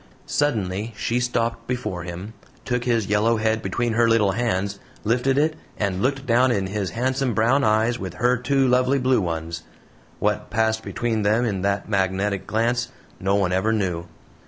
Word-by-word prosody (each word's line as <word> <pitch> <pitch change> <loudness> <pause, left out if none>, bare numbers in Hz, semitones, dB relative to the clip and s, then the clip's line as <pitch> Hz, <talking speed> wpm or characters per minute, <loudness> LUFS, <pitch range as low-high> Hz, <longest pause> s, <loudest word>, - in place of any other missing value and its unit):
Suddenly 110 -6 -1
she 120 +2 0
stopped 115 -1 -1
before 120 -8 -3
him, 90 +5 -7 0.3
took 125 -1 -1
his 115 -4 +1
yellow 105 +3 +2
head 110 0 +1
between 115 +4 -1
her 115 +1 +3
little 110 -3 +4
hands, 100 -3 -1 0.2
lifted 125 +5 +1
it, 155 +2 +2 0.2
and 100 -2 -1
looked 135 +3 0
down 125 +1 +4
in 100 -4 0
his 100 0 -2
handsome 130 +4 -1
brown 120 +6 +3
eyes 110 +3 +2
with 95 -4 -6
her 125 +1 +2
two 135 +2 +1
lovely 130 +2 +3
blue 130 -3 +2
ones. 80 -1 -3 0.6
What - - -1
passed 110 0 +1
between 115 -1 -2
them 110 +4 +2
in 100 -5 -1
that 100 0 -1
magnetic 100 0 0
glance 120 +2 +1 0.3
no 95 +1 +1
one 100 -3 +1
ever 95 +4 +2
knew. 90 -6 -1
110 Hz, 170 wpm, -23 LUFS, 100-120 Hz, 0.6 s, little